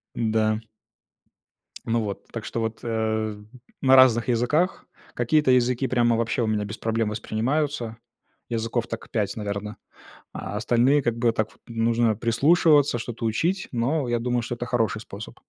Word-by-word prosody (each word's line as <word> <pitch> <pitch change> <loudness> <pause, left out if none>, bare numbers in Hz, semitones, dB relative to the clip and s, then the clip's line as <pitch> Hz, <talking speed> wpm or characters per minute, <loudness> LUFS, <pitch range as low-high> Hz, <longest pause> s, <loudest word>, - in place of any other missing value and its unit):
Да. 110 -1 +1 1.2
Ну 115 0 0
вот, 100 -2 -5
так 115 -2 -6
что 115 - -3
вот, 110 0 -3
э, 110 -2 -1 0.4
на 135 0 +6
разных 125 -2 +5
языках. 135 +10 +1 0.3
Какие-то 130 +3 +2
языки 125 +1 +2
прямо 120 -2 +2
вообще 115 +1 0
у - - +1
меня 105 -1 0
без 105 +2 -7
проблем 115 -1 -1
воспринимаются, 115 +3 -2 0.5
языков 115 0 -2
так 115 - -7
5, 105 -2 -1
наверно, 105 0 -4 0.6
а - - -6
остальные, 120 +6 +3
как 120 -2 -1
бы, 115 -1 +2
так, 110 -1 -1 0.2
нужно 115 -1 +1
прислушиваться, 140 - +3
что-то 115 0 -5
учить, 170 - 0
но 130 +3 0
я 120 -1 0
думаю, 120 0 0
что 120 - -4
это 120 - -5
хороший 115 -3 0
способ. 100 0 -9
115 Hz, 150 wpm, -24 LUFS, 110-125 Hz, 1.2 s, на